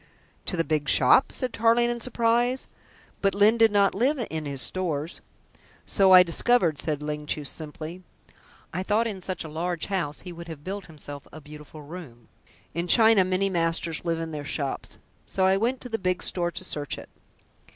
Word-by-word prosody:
"To 180 - -2
the 165 - +2
big 155 -3 -1
shop?" 135 - +5
said 255 -2 -2
Tarling 230 +2 +3
in 240 - -4
surprise. 240 +1 +1 0.5
"But 195 -1 +2
Lyne 215 +3 +4
did 225 -1 +6
not 200 -1 +3
live 260 +9 +1
in 160 -1 -3
his 140 -1 -3
stores!" 165 -2 -2 0.6
"So 195 -1 +3
I 185 -1 +10
discovered," 170 - +2
said 150 -2 -2
Ling 150 0 -4
Chu 150 -1 -2
simply. 155 +4 -8 0.7
"I 180 - -2
thought 210 +4 +1
in 205 -5 -4
such 185 0 -2
a - - -7
large 170 +2 -3
house 170 -7 -3
he 180 - -8
would 170 0 -9
have 160 -3 -9
built 195 +2 -5
himself 145 -3 -9
a 155 - -10
beautiful 150 0 -12
room. 145 -8 -11 0.4
In 170 +2 -2
China 220 -1 +6
many 185 +1 0
masters 165 -2 -1
live 165 -1 -1
in 165 0 -4
their 150 -2 -5
shops. 140 -1 -4 0.3
So 190 - +1
I 190 0 +4
went 240 +6 0
to 250 - -8
the 225 -1 -2
big 185 -1 -1
store 175 -1 +1
to 175 - -4
search 145 -5 -2
it." - - -11
175 Hz, 190 wpm, -26 LUFS, 155-205 Hz, 0.7 s, I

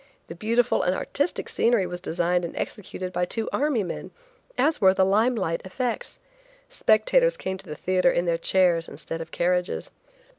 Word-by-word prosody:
The - - -5
beautiful 230 +6 +1
and 180 +1 +1
artistic 290 - -2
scenery 230 -5 +2
was 175 0 -6
designed 175 +1 0
and 170 - -5
executed 185 -3 -5
by 180 - 0
two 225 +4 -2
army 280 -7 +1
men, 175 - -6 0.5
as 315 - +2
were 190 -1 +6
the 190 - +4
lime 220 +6 +3
light 165 -6 -1
effects. 240 +6 -4 0.5
Spectators - - +3
came 190 0 -4
to - - -14
the 150 - -5
theatre 185 +2 +2
in 175 - 0
their 170 -1 0
chairs 175 -2 +3
instead 165 +2 -6
of 165 - -7
carriages. 180 +1 -1
185 Hz, 175 wpm, -25 LUFS, 175-225 Hz, 0.5 s, were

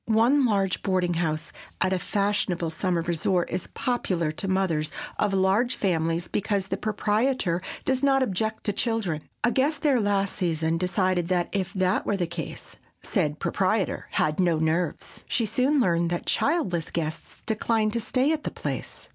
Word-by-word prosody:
One 240 +5 +4
large 195 -4 +1
boarding 185 -3 +1
house 160 -2 -1 0.3
at 185 0 +2
a 185 - 0
fashionable 195 -4 0
summer 170 0 0
resort 175 +1 0
is 180 0 -3
popular 185 -10 0
to 195 +5 -3
mothers 185 -5 0 0.3
of 210 - +2
large 195 +6 +2
families 165 -2 0
because 200 -1 -1
the - - -2
proprietor 215 -3 0 0.2
does 260 -1 +2
not 270 -1 +4
object 220 0 -2
to 205 - 0
children. 205 -9 0 0.2
A 240 - +4
guest 280 +3 +1
there 280 -5 +4
last 200 -2 +1
season 165 -3 0
decided 185 -1 +1
that 180 -1 +1
if 190 -2 -1
that 185 -1 +1
were 205 - +1
the 180 - 0
case 170 0 -7 0.3
said 150 -8 0
proprietor 195 +2 0
had 155 +2 +1
no 175 -3 +3
nerves. 160 +1 -1
She 230 - +1
soon 255 +7 +2
learned 170 -7 +2
that 175 0 -2
childless 190 - 0
guests 160 -1 -4
declined 220 -1 +1
to 235 - +1
stay 255 +6 +1
at 315 - -2
the - - -3
place. - - -5
190 Hz, 165 wpm, -26 LUFS, 170-220 Hz, 0.3 s, One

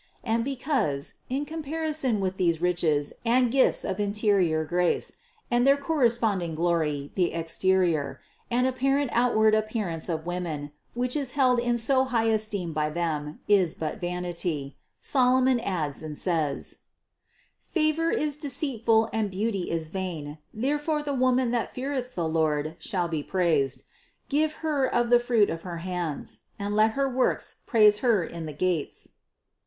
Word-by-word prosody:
And 230 0 0
because, 250 - -1
in 275 +3 -1
comparison 310 -5 -1
with 190 0 -2
these 170 -3 +1
riches 165 -5 +1
and 245 +1 +3
gifts 265 0 +3
of 190 0 -3
interior 200 -6 +1
grace 175 +2 +1 0.4
and 240 0 +3
their 275 +1 +6
corresponding 230 - +1
glory 155 -4 0
the 180 -3 +1
exterior 170 -1 +1 0.3
and 245 +1 +2
apparent 270 +1 +1
outward 220 -3 +3
appearance 215 -7 -1
of 160 -1 -2
women, 170 -5 -4 0.2
which 250 +2 0
is 275 -4 -2
held 255 -3 +3
in 240 0 +1
so 260 +3 +3
high 230 -3 +1
esteem 205 -6 -2
by 150 0 0
them, 155 -2 -3
is 190 -5 +3
but 155 -1 -4
vanity, 175 -5 -3 0.2
Solomon 255 -1 +3
adds 165 -10 -2
and 155 -2 -6
says: 160 -6 -1 1.0
801. 325 0 +2
"Favour - - 0
is 295 -1 -1
deceitful, 245 -6 +1
and 220 -2 0
beauty 195 -1 -2
is 160 -1 -2
vain; 160 -5 -5
there 275 +7 -1
fore 300 0 -1
the 285 -1 -2
woman 255 -1 +2
that 240 -2 0
feareth 255 -1 -4
the 170 -2 -1
Lord, 155 -1 0
shall 180 -5 -2
be 160 -3 -2
praised. 155 -6 0 0.5
Give 305 +2 +2
her 285 -4 +1
of 240 0 +1
the 240 - +7
fruits 235 -4 +2
of 165 0 -5
her 175 -1 -6
hands; 175 -3 -4 0.2
and 205 +1 -3
let 215 +1 +4
her 275 +2 +1
works 255 -1 0
praise 210 -2 +5
her 230 -8 +3
in 165 -1 -6
the 150 - -6
gates." 180 -4 -1
210 Hz, 155 wpm, -26 LUFS, 165-255 Hz, 1.0 s, the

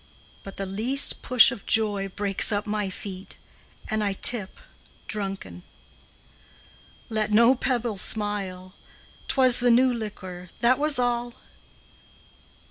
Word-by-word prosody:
But 195 - -11
the 195 - -5
least 230 +9 +1
push 250 -1 +5
of 235 -6 -10
joy 205 -3 0
Breaks 200 +2 0
up 205 +1 -2
my 210 -2 -3
feet, 190 0 -9 0.5
And 215 0 -2
I 200 -1 -1
tip 200 0 0 0.5
drunken. 195 - -6 1.5
Let 215 -1 -2
no 235 +4 +5
pebble 240 -4 -2
smile, 190 -3 -2 0.5
'T - - -3
was 255 -2 +7
the 245 0 +2
new 250 +2 +3
liquor, 185 -5 -8
That 250 +3 +2
was 300 -2 +3
all! 240 -1 -2
215 Hz, 125 wpm, -24 LUFS, 195-240 Hz, 1.5 s, was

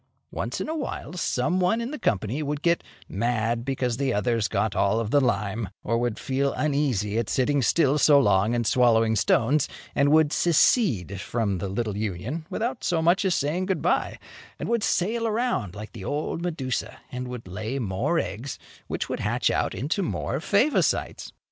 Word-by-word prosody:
Once - - -3
in - - -3
a 320 - -2
while, 285 - -5
some 175 0 0
one 185 +5 +2
in 235 +3 -3
the 300 - -6
company 110 +7 0
would 150 0 -3
get 170 0 +2 0.2
mad 115 +2 -1
because 125 -2 -1
the 135 0 0
others 115 +1 +1
got 105 -2 -1
all 100 +3 +2
of 115 -1 -3
the 145 - +4
lime, 110 -4 -1
or 115 - 0
would 120 -2 -1
feel 135 +1 -1
uneasy 130 -8 0
at 115 - -2
sitting 140 +2 +1
still 145 +2 +3
so 145 -1 +6
long 110 -3 +3
and 120 -1 0
swallowing 115 -2 +3
stones, 130 +7 +2 0.2
and 140 +1 +3
would 155 -1 +4
secede 135 - +2
from 105 -5 -1
the 95 - -3
little 105 +1 -2
union, 110 - -4
without 225 +6 -2
as 165 -3 +1
much 175 +4 +3
as 190 -3 +2
saying 165 +6 -1
"Good 190 -5 -1
bye," - - +1 0.4
and - - -5
would 235 -1 +1
sail 225 +5 0
around 220 - -1
like 105 +1 -8
the 95 -5 -9
old 150 - -2
Medusa, 150 -8 -3
and 125 0 -4
would 125 -5 -7
lay 110 +8 -4
more 120 - -1
eggs, 125 0 -3 0.3
which - - -3
would - - -3
hatch - - +1
out - - 0
into 145 - -1
more 175 - -2
Favosites. 220 - +1
130 Hz, 185 wpm, -25 LUFS, 110-165 Hz, 0.4 s, so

